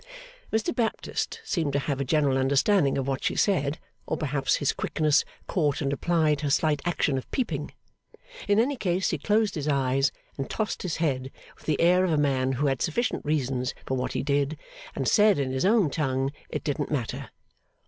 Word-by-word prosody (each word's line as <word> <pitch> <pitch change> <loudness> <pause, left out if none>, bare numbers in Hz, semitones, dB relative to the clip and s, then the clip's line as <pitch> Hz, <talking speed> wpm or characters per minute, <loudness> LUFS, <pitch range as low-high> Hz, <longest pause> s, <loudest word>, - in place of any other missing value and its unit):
Mr 220 0 0
Baptist 235 - -2
seemed 165 - -1
to - - +2
have 140 -1 -1
a - - +2
general 140 0 +2
understanding 140 +4 +3
of 135 -1 -2
what 135 -1 -2
she - - 0
said; 150 -7 +1 0.3
or - - -1
perhaps 140 -3 0
his 145 - 0
quickness 155 -2 +2 0.2
caught 150 -6 0
and 140 -2 -1
applied 155 -1 +1
her 145 - -1
slight 150 0 +2
action 150 -6 +1
of - - -12
peeping. 160 - -2 0.8
In 205 - +3
any 270 +5 +2
case 185 -3 0
he 165 - -2
closed 210 +6 +2
his 150 -3 -3
eyes 135 -1 +2 0.3
and 135 - -3
tossed 215 -1 -2
his 180 -5 -2
head 135 -5 -1 0.3
with - - -20
the 150 -3 +1
air 180 +2 +5
of 185 - +1
a - - +2
man 135 -2 +1
who 135 +3 0
had 135 -3 0
sufficient 235 +9 -1
reasons 130 -4 -1
for 130 - -1
what 130 0 -2
he - - -1
did, 140 +1 0 0.4
and - - -2
said 210 -2 +5
in 135 -2 -1
his 130 +5 0
own 200 -7 +4
tongue, 135 -3 0 0.2
it - - -4
didn't 145 -1 -2
matter. 130 -7 -3
145 Hz, 195 wpm, -26 LUFS, 135-175 Hz, 0.8 s, air